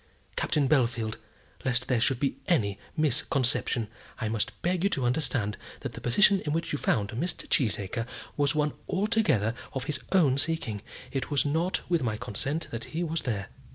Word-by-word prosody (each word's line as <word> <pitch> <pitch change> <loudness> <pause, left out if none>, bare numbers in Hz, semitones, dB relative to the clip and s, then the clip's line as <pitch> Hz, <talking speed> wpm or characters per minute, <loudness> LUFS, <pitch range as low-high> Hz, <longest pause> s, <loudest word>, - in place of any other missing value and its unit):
Captain 145 -3 +1
Bellfield, 120 -6 +2 0.5
lest 125 -1 +1
there 125 -3 +2
should 125 +1 +2
be 135 0 0
any 100 - +2 0.2
misconception, 135 -5 +1 0.3
I 110 - -1
must 110 -1 -1
beg 180 0 +1
you 200 - +4
to 135 -10 0
understand 125 -5 +1 0.2
that - - -4
the - - -8
position 200 - +5
in 150 - -2
which 165 +1 -1
you 145 - -1
found 105 -2 +1
Mr. 145 +10 -3
Cheesacre 110 - +1 0.3
was 145 +1 +2
one 150 0 +1 0.2
altogether 200 - +2 0.2
of 135 -2 -2
his 145 +1 -2
own 145 -8 +4
seeking. 140 -10 -1 0.3
It 135 -2 -2
was 145 -3 +4
not 160 +6 +1
with 170 -3 +2
my 110 -4 0
consent 140 +11 -2
that 115 0 -4
he 175 - +1
was 165 -1 -1
there." 100 -6 -2
135 Hz, 175 wpm, -28 LUFS, 115-160 Hz, 0.5 s, position